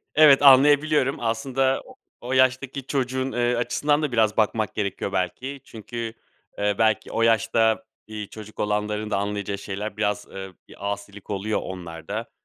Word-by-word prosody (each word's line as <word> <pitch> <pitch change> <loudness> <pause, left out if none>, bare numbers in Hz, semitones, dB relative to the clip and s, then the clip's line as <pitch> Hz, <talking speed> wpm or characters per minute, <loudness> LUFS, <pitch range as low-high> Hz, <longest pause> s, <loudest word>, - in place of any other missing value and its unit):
Evet, 145 -2 +7
anlayabiliyorum. 145 +1 +5
Aslında 130 +4 0
o 255 - -15 0.3
o 125 +2 -5
yaştaki 130 +1 +1
çocuğun, 130 -1 -1
eee, 120 0 +1
açısından 145 +5 +1
da 150 -4 -1
biraz 110 -2 +2
bakmak 110 -1 +1
gerekiyor 100 -1 -3
belki. 130 +10 -3
Çünkü, 115 0 -6 0.4
eee, 105 0 +1
belki 110 -2 +1
o 115 - 0
yaşta, 115 0 +3 0.2
iii, 105 -2 -6
çocuk 110 -1 -10
olanların 105 0 -1
da - - +1
anlayacağı 100 0 -3
şeyler 100 +2 -5
biraz, 105 -1 -1
eee, 95 0 -7 0.2
bir 100 - -5
asilik 100 0 -9
oluyor 105 +2 -1
onlarda. 90 +5 -6
110 Hz, 150 wpm, -24 LUFS, 105-130 Hz, 0.4 s, Evet